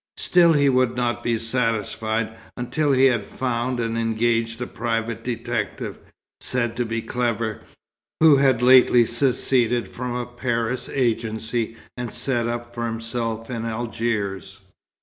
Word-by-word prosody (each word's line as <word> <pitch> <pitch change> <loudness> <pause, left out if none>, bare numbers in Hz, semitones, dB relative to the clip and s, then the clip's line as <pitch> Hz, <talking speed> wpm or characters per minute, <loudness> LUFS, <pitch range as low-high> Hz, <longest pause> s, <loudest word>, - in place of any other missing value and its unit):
Still 170 -2 +4
he 145 -2 +3
would 130 -2 +2
not 120 -1 -1
be 115 -1 0
satisfied, 115 -1 -1 0.2
until 135 +5 0
he 135 0 +5
had 120 -6 +3
found 125 +1 -2
and 115 -1 -1
engaged 115 0 0
a 125 - -2
private 115 -1 -3
detective, 120 -3 -3 0.4
said 120 -2 -1
to 120 - 0
be 115 0 -3
clever, 115 -3 -2 0.6
who 155 -3 +7
had 130 -3 +3
lately 125 -1 +7
seceded 120 -2 +2
from 125 +4 -5
a 125 0 -2
Paris 120 0 -2
agency 115 -2 -1 0.2
and 125 -2 -5
set 120 -4 -1
up 120 0 -4
for 120 0 -3
himself 115 0 -3
in 115 -2 -3
Algiers. 110 -4 -3
120 Hz, 135 wpm, -23 LUFS, 115-125 Hz, 0.6 s, who